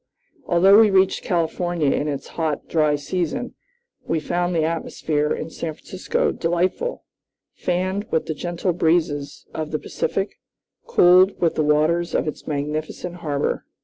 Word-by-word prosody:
Although 190 Hz, +4 st, +6 dB
we 220 Hz, -1 st, +6 dB
reached 190 Hz, -1 st, +3 dB
California 175 Hz, -3 st, 0 dB
in 150 Hz, -, 0 dB
its 140 Hz, -2 st, -4 dB
hot, 160 Hz, -3 st, -2 dB
dry 155 Hz, -2 st, +2 dB
season, 180 Hz, -, -3 dB, 0.5 s
we 165 Hz, -, -1 dB
found 175 Hz, +3 st, -1 dB
the 160 Hz, -, +2 dB
atmosphere 155 Hz, -2 st, -1 dB
in 160 Hz, -, -3 dB
San 160 Hz, -1 st, -5 dB
Francisco 185 Hz, +3 st, -2 dB
delightful, 180 Hz, -, -1 dB, 0.5 s
fanned 185 Hz, +4 st, -2 dB
with 160 Hz, -, 0 dB
the 160 Hz, -, -2 dB
gentle 175 Hz, +3 st, -2 dB
breezes 155 Hz, -4 st, 0 dB
of 155 Hz, -1 st, -4 dB
the 155 Hz, -, -1 dB
Pacific, 195 Hz, +5 st, -3 dB, 0.5 s
cooled 185 Hz, -, +5 dB
with 170 Hz, -2 st, +2 dB
the 155 Hz, -, 0 dB
waters 155 Hz, +3 st, +2 dB
of -, -, 0 dB
its 155 Hz, -, -6 dB
magnificent 155 Hz, +4 st, -3 dB
harbor. 145 Hz, -4 st, -2 dB
170 Hz, 145 wpm, -22 LUFS, 155-180 Hz, 0.5 s, Although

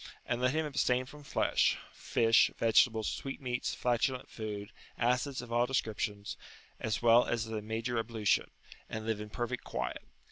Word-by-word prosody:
And 120 Hz, 0 st, -1 dB
let 125 Hz, +1 st, +3 dB
him 160 Hz, 0 st, +1 dB
abstain 130 Hz, -3 st, +1 dB
from 150 Hz, +3 st, -12 dB
flesh, 140 Hz, -, +2 dB, 0.2 s
fish, 115 Hz, 0 st, +4 dB
vegetables, 110 Hz, -1 st, +4 dB
sweetmeats, 130 Hz, -2 st, -3 dB
flatulent 125 Hz, +1 st, 0 dB
food, 105 Hz, -1 st, -5 dB, 0.3 s
acids 125 Hz, +2 st, +1 dB
of 120 Hz, -, -10 dB
all 120 Hz, +1 st, +3 dB
descriptions, 105 Hz, -5 st, -2 dB, 0.4 s
as 110 Hz, +1 st, -2 dB
well 120 Hz, +1 st, +6 dB
as 115 Hz, -1 st, 0 dB
the 110 Hz, -1 st, -4 dB
major 115 Hz, +2 st, -2 dB
ablution, 110 Hz, -2 st, +1 dB, 0.4 s
and 110 Hz, 0 st, -4 dB
live 110 Hz, -2 st, -1 dB
in 105 Hz, -, -7 dB
perfect 120 Hz, +2 st, -3 dB
quiet. 60 Hz, 0 st, -3 dB
115 Hz, 150 wpm, -32 LUFS, 110-125 Hz, 0.4 s, well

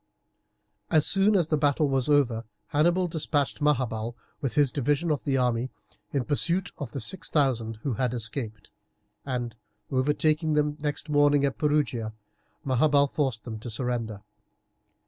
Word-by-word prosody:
As 155 Hz, -2 st, +4 dB
soon 200 Hz, +2 st, +4 dB
as 170 Hz, -5 st, +2 dB
the 155 Hz, -, +1 dB
battle 145 Hz, +1 st, +2 dB
was 135 Hz, 0 st, +1 dB
over 125 Hz, -6 st, +2 dB, 0.2 s
Hannibal 175 Hz, +5 st, +2 dB
despatched 150 Hz, -3 st, -1 dB
Maharbal 120 Hz, -6 st, 0 dB, 0.3 s
with 135 Hz, -5 st, -2 dB
his 145 Hz, -3 st, +3 dB
division 145 Hz, +5 st, 0 dB
of 145 Hz, -, -2 dB
the 135 Hz, -2 st, +1 dB
army 125 Hz, 0 st, 0 dB, 0.4 s
in 135 Hz, -4 st, -1 dB
pursuit 170 Hz, +6 st, +1 dB
of 140 Hz, -6 st, -5 dB
the 140 Hz, -, -3 dB
six 180 Hz, -, 0 dB
thousand 120 Hz, -7 st, +1 dB
who 135 Hz, -, -1 dB
had 125 Hz, +2 st, 0 dB
escaped, 115 Hz, -2 st, -3 dB, 0.6 s
and, 120 Hz, -3 st, -3 dB, 0.4 s
overtaking 150 Hz, +4 st, +1 dB
them 150 Hz, 0 st, +1 dB
next 150 Hz, +1 st, -2 dB
morning 145 Hz, -1 st, +4 dB
at 135 Hz, -, -2 dB
Perugia, 140 Hz, -7 st, 0 dB, 0.5 s
Maharbal 140 Hz, +2 st, +3 dB
forced 130 Hz, -7 st, -1 dB
them 110 Hz, -3 st, -6 dB
to 120 Hz, -, -7 dB
surrender. 115 Hz, -3 st, -3 dB
140 Hz, 145 wpm, -27 LUFS, 120-150 Hz, 0.6 s, As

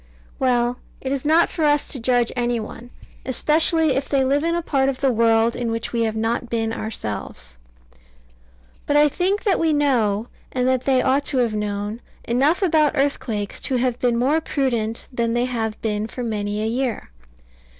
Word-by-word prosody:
Well 245 Hz, -1 st, +1 dB, 0.2 s
it 265 Hz, -, -4 dB
is 275 Hz, -2 st, -2 dB
not 320 Hz, +3 st, +5 dB
for 320 Hz, -, -3 dB
us 295 Hz, -1 st, +3 dB
to 270 Hz, -, -3 dB
judge 240 Hz, 0 st, +2 dB
any 240 Hz, -1 st, 0 dB
one, 230 Hz, +2 st, -8 dB, 0.3 s
especially 315 Hz, +4 st, +2 dB
if 270 Hz, +1 st, -2 dB
they 270 Hz, -2 st, +2 dB
live 280 Hz, +3 st, +1 dB
in 335 Hz, +1 st, +1 dB
a 345 Hz, -, -1 dB
part 270 Hz, -4 st, +1 dB
of 265 Hz, -, -3 dB
the 270 Hz, -2 st, +2 dB
world 230 Hz, 0 st, +3 dB
in 240 Hz, -2 st, -2 dB
which 230 Hz, +1 st, -3 dB
we 235 Hz, -, 0 dB
have 220 Hz, -1 st, -2 dB
not 230 Hz, +2 st, -1 dB
been 225 Hz, -1 st, -1 dB
ourselves. 100 Hz, -, -5 dB, 1.3 s
But 290 Hz, -, +3 dB
I 295 Hz, 0 st, +6 dB
think 370 Hz, +7 st, 0 dB
that 405 Hz, -4 st, +2 dB
we 325 Hz, -1 st, +2 dB
know, 235 Hz, -7 st, +1 dB, 0.2 s
and 250 Hz, 0 st, 0 dB
that 260 Hz, -1 st, +1 dB
they 260 Hz, -2 st, +3 dB
ought 275 Hz, +2 st, +2 dB
to 270 Hz, -, 0 dB
have 240 Hz, -3 st, +2 dB
known, 210 Hz, +1 st, -3 dB, 0.2 s
enough 280 Hz, -, +2 dB
about 310 Hz, -4 st, +3 dB
earthquakes 235 Hz, -7 st, -1 dB
to 265 Hz, -, -1 dB
have 250 Hz, -1 st, 0 dB
been 240 Hz, -2 st, +1 dB
more 280 Hz, +7 st, +2 dB
prudent 235 Hz, -7 st, -2 dB
than 235 Hz, -1 st, 0 dB
they 240 Hz, +1 st, +2 dB
have 225 Hz, -3 st, -3 dB
been 210 Hz, -1 st, -1 dB
for 250 Hz, +2 st, -6 dB
many 210 Hz, -2 st, -2 dB
a -, -, -1 dB
year. 235 Hz, -, -2 dB
245 Hz, 190 wpm, -22 LUFS, 225-280 Hz, 1.3 s, I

